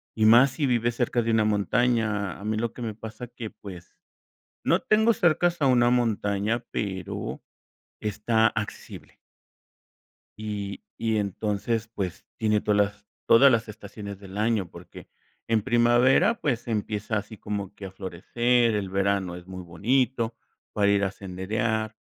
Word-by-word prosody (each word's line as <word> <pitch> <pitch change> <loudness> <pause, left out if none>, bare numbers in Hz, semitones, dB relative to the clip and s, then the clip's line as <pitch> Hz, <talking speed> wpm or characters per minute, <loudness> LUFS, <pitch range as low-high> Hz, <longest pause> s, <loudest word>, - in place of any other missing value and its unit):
y 110 - +2
más 120 +4 +7
si 150 - -1
vives 120 -2 +1
cerca 120 0 +1
de 115 - 0
una 110 -1 +3
montaña. 110 -1 +1
A - - -10
mí 110 +1 -1
lo 115 0 -2
que - - -10
me 110 -3 -4
pasa 110 +2 -8
que, 120 -2 -8
pues, 90 -4 -11 0.7
no - - +3
tengo 220 +2 +3
cercas 175 -2 +2
a 140 - +3
una 120 -2 +4
montaña, 110 -1 0
pero 95 -4 -4 0.6
está 110 +2 +1
accesible. 105 -2 -7 1.2
Y 105 -2 -5 0.2
y 110 -1 0
entonces, 105 +2 -2
pues, 95 -5 -4
tiene 105 -1 +1
todas 105 -1 +1
las 105 0 0 0.2
todas 135 +4 +7
las 115 -1 +1
estaciones 100 -1 -9
del 100 0 -10
año, 110 -4 +1
porque 85 +1 -12 0.4
en 115 -1 +2
primavera, 120 - +4
pues, 125 -5 -1
empieza 105 -1 -2
así 105 +2 -6
como 100 -1 -5
que 100 - -8
a 95 - -7
florecer, 115 +6 +1
el 100 -2 -2
verano 100 -2 0
es 90 0 -10
muy 95 -1 -7
bonito 115 +6 0 0.4
para 105 -2 +2
ir 100 0 +2
a 95 - 0
senderear. 110 +4 -2
110 Hz, 150 wpm, -26 LUFS, 100-120 Hz, 1.2 s, más